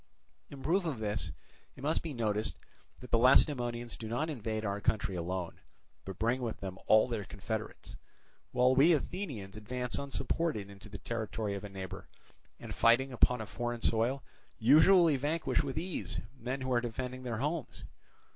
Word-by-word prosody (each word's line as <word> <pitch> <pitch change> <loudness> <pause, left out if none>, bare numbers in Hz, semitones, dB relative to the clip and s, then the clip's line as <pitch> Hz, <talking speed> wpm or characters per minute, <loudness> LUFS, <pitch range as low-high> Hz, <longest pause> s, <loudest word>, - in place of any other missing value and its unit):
In 135 -1 -10
proof 185 +5 +2
of 160 -7 -2
this 105 -1 -2 0.4
it - - -12
may 155 +2 +2
be 165 - -5
noticed 110 -4 -1 0.5
that 125 - -11
the 115 - +4
Lacedaemonians 120 -2 +3
do 110 - -7
not 145 +8 -1
invade 110 -4 -3
our 100 0 -2
country 105 -2 0
alone, 90 0 -3 0.5
but 95 -1 -6
bring 120 +3 +1
with 115 -3 -3
them 95 -1 -6
all 110 +2 +6
their 115 -4 -2
confederates; 110 +2 -6 0.5
while 125 +1 +4
we 145 +6 +6
Athenians 135 - -3
advance 125 +3 -2
unsupported 140 -5 -2
into 100 +1 -12
the 105 - -7
territory 110 -1 -3
of 100 - -5
a 105 - -6
neighbour, 95 0 -7 0.5
and - - -7
fighting 125 +3 +4
upon 125 -1 +3
a - - -4
foreign 120 +2 -4
soil 120 +4 +1 0.3
usually 155 - +6
vanquish 150 +5 0
with 140 -1 -4
ease 175 +2 -2 0.2
men 130 +1 -4
who 130 0 -1
are 120 - +3
defending 125 +2 -4
their 120 -3 -3
homes. 150 +3 -3
120 Hz, 165 wpm, -32 LUFS, 110-135 Hz, 0.5 s, all